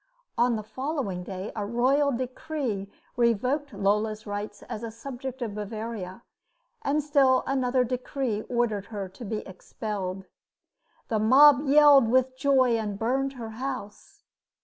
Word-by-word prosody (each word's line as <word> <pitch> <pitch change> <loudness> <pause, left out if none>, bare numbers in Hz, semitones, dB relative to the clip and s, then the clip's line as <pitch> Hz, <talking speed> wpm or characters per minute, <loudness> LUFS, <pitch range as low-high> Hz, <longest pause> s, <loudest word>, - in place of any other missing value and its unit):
On 240 0 +2
the 215 - -4
following 255 - -3
day 190 +2 -6
a 210 - -2
royal 260 +7 +2
decree 255 -4 -3 0.3
revoked 250 +5 +1
Lola's 210 +2 0
rights 205 0 -5
as 215 - -6
a 230 - -4
subject 255 +2 -7
of 220 -3 -4
Bavaria, 215 -1 -6 0.6
and 300 -6 0
still 275 -3 +3
another 255 -1 +1
decree 250 -2 -2
ordered 235 -5 0
her 205 -3 -5
to 195 +6 -11
be 215 0 -4
expelled. 190 0 -5 0.8
The 220 - +1
mob 275 +6 +7
yelled 285 -3 +7
with 255 +1 +2
joy 260 -3 +3
and 210 -2 -3
burned 265 +5 0
her 235 -4 -7
house. 255 - -7
235 Hz, 135 wpm, -27 LUFS, 210-270 Hz, 0.8 s, mob